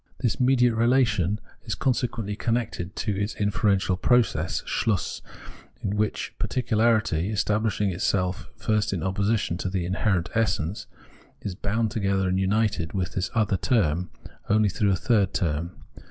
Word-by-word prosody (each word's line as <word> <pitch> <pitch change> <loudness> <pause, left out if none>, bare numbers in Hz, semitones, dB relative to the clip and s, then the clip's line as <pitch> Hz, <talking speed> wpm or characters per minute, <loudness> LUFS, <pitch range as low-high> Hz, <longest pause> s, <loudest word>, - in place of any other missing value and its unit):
This 120 -4 0
mediate 125 -2 +4
relation 115 -5 +2 0.2
is 110 - -3
consequently 120 -3 -1
a - - -5
connected 115 -6 -2 0.4
inferential 100 -2 +2
process 120 +5 +1
{Schluss), 105 -6 -1 0.6
in 100 - -1
which 105 0 -1
particularity, 110 -7 +1
esua^blifihing 105 -1 0
itself 90 +1 -1
at - - -33
first 105 -1 +1
in 85 -5 -2
opposition 100 -1 0
to 95 - -3
the 95 -2 -2
inherent 95 -1 0
esseAce, 105 -5 -1 0.5
is 100 - -4
bound 105 +4 -1
together 100 -4 0
and 95 +1 +1
united 95 -4 0
with 95 -1 -2
this 95 0 -1
other 105 -3 +2
term, 90 - +1 0.4
only 105 0 +4
through 100 +2 +1
a 95 - +3
third 100 -1 +1
term. 85 +1 -1
105 Hz, 140 wpm, -25 LUFS, 95-115 Hz, 0.6 s, mediate